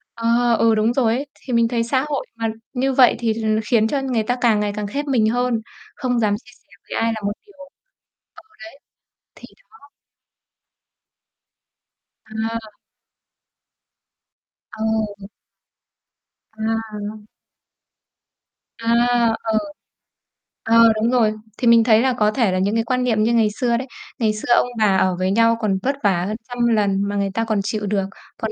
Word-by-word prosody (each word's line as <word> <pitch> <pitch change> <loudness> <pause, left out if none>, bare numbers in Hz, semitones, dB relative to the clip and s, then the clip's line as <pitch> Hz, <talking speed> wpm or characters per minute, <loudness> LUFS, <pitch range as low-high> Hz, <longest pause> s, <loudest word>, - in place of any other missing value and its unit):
Ờ, 235 +1 +2
ừ, 225 -1 +4
đúng 220 +2 +1
rồi 240 -4 +2
ấy. 275 +3 -3
Thì 255 - -7
mình 235 0 +3
thấy 230 -1 -1
xã 260 +4 0
hội 285 -2 -2
mà 230 0 -2 0.3
như 265 +1 0
vậy 255 -1 +5
thì 230 -2 0
là 220 0 -3
nó 215 0 +1
khiến 220 -2 +4
cho 275 +4 -1
người 250 -5 -1
ta 245 +3 -1
càng 225 -4 +3
ngày 205 -1 -1
càng 210 -1 -3
khép 285 +8 -4
mình 235 -6 +2
hơn, 245 -1 0 0.3
không 250 -3 -1
dám 210 -3 +1
chia 245 - -17
sẻ - - -31 0.2
với - - -2
ai 230 0 +1
là 220 - -6
một 200 - 0
điều 405 - -20
ừ, 280 - -11 1.5
đấy. - - -70
Thì - - -12 0.2
đó! 290 -10 -20 2.4
À. 220 0 -5 2.0
Ừ. 220 -2 -3 1.3
À. 220 -1 -4 1.5
À, 230 - -8 0.6
ừ. 220 - +2 1.1
Ờ, 230 0 +6
đúng 225 +3 0
rồi. 225 -4 +3 0.2
Thì 245 - -1
mình 230 -1 +6
thấy 220 -1 +4
là 260 0 +2
có 210 -3 +2
thể 230 -5 +1
là 185 - 0
những 200 +3 0
cái 225 - +1
quan 250 +2 -1
niệm 220 -4 +1
như 230 +2 +2
ngày 225 -2 +3
xưa 240 -2 +1
đấy, 260 +2 -5 0.3
ngày 220 -3 +1
xưa 215 +3 0
ông - - +2
bà 200 -3 +3
ở 185 -1 +2
với 185 +1 0
nhau 230 +2 +3
còn 200 -3 +1
vất 275 +2 0
vả 180 -4 +2
hơn 215 +1 -3
trăm 245 -1 0
lần 205 -4 +1
mà 205 - -3
người 200 -1 0
ta 225 - 0
còn 220 -2 0
chịu 215 0 -3
được, 200 -1 0 0.3
còn 220 - -3
225 Hz, 175 wpm, -20 LUFS, 215-240 Hz, 2.4 s, Ờ